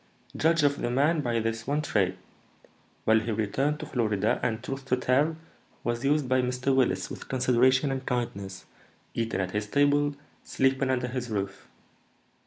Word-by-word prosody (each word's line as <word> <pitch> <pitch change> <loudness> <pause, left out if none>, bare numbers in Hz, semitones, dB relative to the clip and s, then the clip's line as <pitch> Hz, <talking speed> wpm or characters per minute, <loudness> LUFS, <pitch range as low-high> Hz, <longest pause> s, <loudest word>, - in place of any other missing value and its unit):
"Judge 165 0 +3
of 145 0 +2
the - - 0
man 145 +6 +2
by 120 -4 0
this 115 +1 -3
one 145 +2 +1
trait. 95 -8 +1 0.9
Well, 110 0 +5
he 115 - -5
returned 130 +8 0
to - - -4
Florida, 110 -4 0
and, 110 -2 -1
truth 135 0 -5
to 130 -1 +1
tell, 140 +6 +2 0.5
was 120 0 -2
used 145 0 +2
by 130 0 +3
Mr. 125 +2 0
Willis 95 -8 +1
with - - -8
consideration 130 +2 +3
and 135 0 -3
kindness, 100 -7 -3 0.5
eating 115 -4 -1
at 90 0 -3
his 105 +1 -2
table, 145 +3 +2 0.3
sleeping 135 0 +1
under 125 -1 +1
his 125 0 -4
roof. 100 -3 -4
125 Hz, 165 wpm, -27 LUFS, 110-135 Hz, 0.9 s, Well